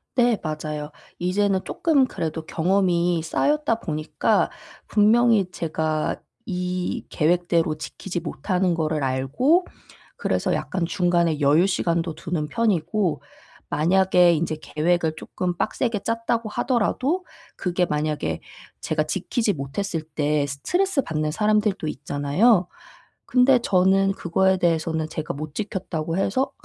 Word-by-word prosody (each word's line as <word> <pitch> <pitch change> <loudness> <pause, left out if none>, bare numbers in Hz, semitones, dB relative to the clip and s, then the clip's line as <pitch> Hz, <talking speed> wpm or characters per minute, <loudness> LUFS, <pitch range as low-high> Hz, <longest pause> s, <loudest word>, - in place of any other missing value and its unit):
네 240 -3 +3
맞아요. 155 -1 -4 0.3
이제는 190 +2 +1
쪼끔 295 -5 +2
그래도 160 -8 -4
경험이 175 -1 +1
쌓였다 290 - +1
보니까 155 -4 0 0.4
분명히 215 -2 +4
제가 155 -2 -2 0.2
이 180 -3 -3
계획대로 170 -1 +1
지키지 180 +2 -5
못하는 180 +3 -1
거를 155 -2 -1
알고 135 - +2 0.5
그래서 - - 0
약간 180 -3 -2
중간에 170 -3 +1
여유 150 +5 +4
시간도 170 -3 0
두는 165 -1 -3
편이고 195 -4 0 0.5
만약에 180 +1 +4
인제 155 0 -2
계획을 160 0 0
조금 180 +2 -4
빡세게 215 0 -1
짰다고 230 0 -1
하더라도 260 - 0 0.3
그게 180 -1 0
만약에 150 - -2 0.4
제가 155 -1 0
지키지 205 +6 -1
못했을 160 +4 -3
때 150 -1 0
스트레스받는 160 - -1
사람들도 210 -2 +1
있잖아요. 175 +9 +2 0.6
근데 250 +1 +5
저는 195 -2 +3
그거에 190 +1 +1
대해서는 160 -2 0
제가 155 -1 -4
못 150 +1 -7
지켰다고 175 -5 -3
해서 235 +8 0
175 Hz, 285 characters per minute, -23 LUFS, 155-205 Hz, 0.6 s, 근데